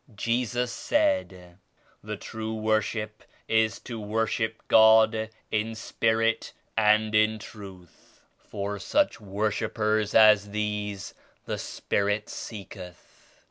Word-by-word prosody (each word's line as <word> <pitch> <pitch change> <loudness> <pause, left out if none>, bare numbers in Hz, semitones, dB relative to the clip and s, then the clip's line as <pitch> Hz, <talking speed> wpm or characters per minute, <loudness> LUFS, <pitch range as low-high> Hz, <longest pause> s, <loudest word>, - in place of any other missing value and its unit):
Jesus 120 +3 -1
said 115 - -1 0.4
*The - - -5
true 110 0 -5
worship 110 0 -1 0.2
is 110 -1 +2
to 115 -3 -7
worship 110 +1 -2
God 110 0 +5 0.2
in 110 +1 -1
Spirit 115 0 0 0.2
and 110 0 +3
in 110 +1 +3
Truth; 95 -5 -13 0.2
for 100 0 -5
such 290 - +1
worshippers 105 +1 -1
as 105 -2 +6
these 105 -1 -3 0.3
the - - -3
Spirit 105 +1 -2
seeketh.' 95 -4 -10
110 Hz, 100 wpm, -27 LUFS, 105-110 Hz, 0.4 s, as